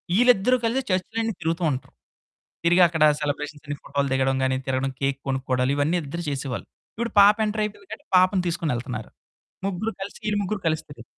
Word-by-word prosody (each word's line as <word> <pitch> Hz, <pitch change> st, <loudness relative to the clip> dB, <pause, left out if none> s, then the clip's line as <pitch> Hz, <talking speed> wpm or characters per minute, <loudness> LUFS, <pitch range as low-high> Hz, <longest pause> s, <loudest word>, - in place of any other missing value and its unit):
ఈళ్ళిద్దరూ 245 Hz, +1 st, +5 dB
కలిసి 250 Hz, +4 st, +1 dB
చర్చులన్నీ 220 Hz, +4 st, -1 dB
తిరుగుతూ 165 Hz, +2 st, -1 dB
ఉంటారు. 130 Hz, -1 st, -5 dB, 0.7 s
తిరిగి 175 Hz, +2 st, +5 dB
అక్కడ 160 Hz, -2 st, -1 dB, 0.2 s
సెలబ్రేషన్స్ 150 Hz, 0 st, -3 dB
అన్ని 145 Hz, 0 st, -4 dB
ఫోటోలు 140 Hz, 0 st, -1 dB
దిగడం 135 Hz, 0 st, +2 dB
గానీ, 130 Hz, 0 st, +2 dB
తిరగడం 135 Hz, 0 st, 0 dB
కేక్ 135 Hz, 0 st, 0 dB
కొనుక్కోవడాలు. 130 Hz, -1 st, 0 dB
ఇవన్నీ 155 Hz, +5 st, +1 dB
ఇద్దరూ 160 Hz, +5 st, -5 dB
చేసేవాళ్ళు. 135 Hz, -3 st, -4 dB, 0.3 s
ఇప్పుడు 235 Hz, +1 st, -3 dB
పాప 205 Hz, +1 st, +7 dB
ఎంటర్ 215 Hz, 0 st, -1 dB
అయిపోయింది 210 Hz, -, -7 dB
కాబట్టి, 290 Hz, -, -9 dB
పాపను 185 Hz, 0 st, +4 dB
తీసుకొనెళ్తున్నారు. 130 Hz, -9 st, -3 dB, 0.6 s
ముగ్గురు 200 Hz, +4 st, -2 dB
కలిసి, 195 Hz, +1 st, -6 dB
ఈళ్ళు 210 Hz, -1 st, +1 dB
ముగ్గురు 200 Hz, +1 st, -2 dB
కలుస్తారు. 150 Hz, -6 st, -2 dB
165 Hz, 160 wpm, -24 LUFS, 135-205 Hz, 0.7 s, పాప